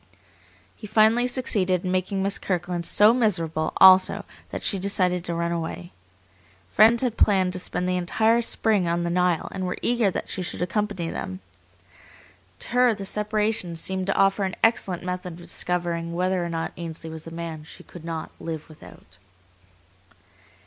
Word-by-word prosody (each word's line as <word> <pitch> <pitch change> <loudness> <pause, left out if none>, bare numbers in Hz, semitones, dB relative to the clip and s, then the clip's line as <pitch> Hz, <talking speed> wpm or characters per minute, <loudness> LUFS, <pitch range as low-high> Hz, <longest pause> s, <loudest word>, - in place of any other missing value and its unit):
He 215 - -10
finally 220 +3 +4
succeeded 195 -8 0
in 180 - -1
making 185 +1 -1
Miss 200 0 +1
Kirkland 175 -2 -2
so 210 +2 +6
miserable 165 -10 0
also 190 0 +6 0.2
that - - -6
she 195 - +1
decided 185 -2 +1
to 170 - -3
run 170 0 -1
away. 170 +1 -5 0.8
Friends 225 +3 +5
had 240 -3 -1
planned 190 -3 +3
to 185 - -2
spend 180 0 -3
the 180 -1 0 0.2
early 225 +2 +4
spring 215 -5 +1
on 170 +1 0
the 170 - -2
Nile 180 -2 +1
and 190 - -5
were 180 - -3
eager 235 -4 +2
that - - -4
she - - -4
should 180 - -5
accompany 190 -2 -2
them. 95 0 -5 1.2
To - - -5
her 245 -1 +3
the 200 -1 -7
separation 210 -3 -1
seemed 190 +3 -2
to 195 - 0
offer 195 +1 +2
an 190 -1 -2
excellent 195 -6 +1
method 180 -1 -4
of - - -12
discovering 170 -1 -2
whether 185 0 0
or 170 - -3
not 165 -1 -3
Ainsley 165 -1 -7
was 160 0 -8
the - - -7
man 165 -2 -6
she 160 - -13
could 175 - -13
not 165 -1 -5
"live 160 -2 -6
without." 155 - -16
180 Hz, 170 wpm, -24 LUFS, 170-210 Hz, 1.2 s, so